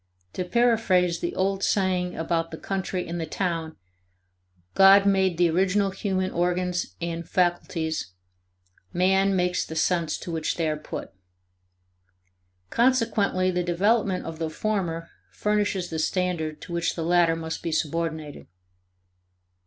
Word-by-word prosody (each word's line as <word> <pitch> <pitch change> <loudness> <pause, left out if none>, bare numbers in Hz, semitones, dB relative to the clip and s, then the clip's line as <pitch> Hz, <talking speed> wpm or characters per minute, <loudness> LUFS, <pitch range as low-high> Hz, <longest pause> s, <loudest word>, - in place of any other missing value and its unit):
To 185 - -2
paraphrase 190 -5 +2
the 175 - -3
old 195 +1 0
saying 185 -2 0
about 165 0 -1
the 160 - -7
country 190 -1 -3
and 170 0 -4
the 160 - -3
town, 165 -2 -2 1.0
God 195 +1 +7
made 190 -3 +2
the 175 0 +4
original 195 +3 +2
human 190 -1 -2
organs 180 +1 -1
and 170 -1 -4
faculties, 170 - -1 0.8
man 190 +2 +2
makes 180 -1 +1
the 160 - -8
uses 170 0 +1
to 175 - -6
which 160 -1 -1
they 165 -2 0
are 155 - 0
put. 150 - -7 1.6
Consequently 225 -7 +2
the 180 0 0
development 190 +3 +1
of 165 -1 -7
the 160 -1 -2
former 165 -3 -2 0.2
furnishes 205 -4 -1
the 160 - -2
standard 160 -2 -1
to 170 - -8
which 170 -1 -1
the 165 - -3
latter 170 -1 +3
must 160 0 -5
be 165 - -3
subordinated. 155 -1 -3
180 Hz, 135 wpm, -25 LUFS, 165-190 Hz, 1.6 s, God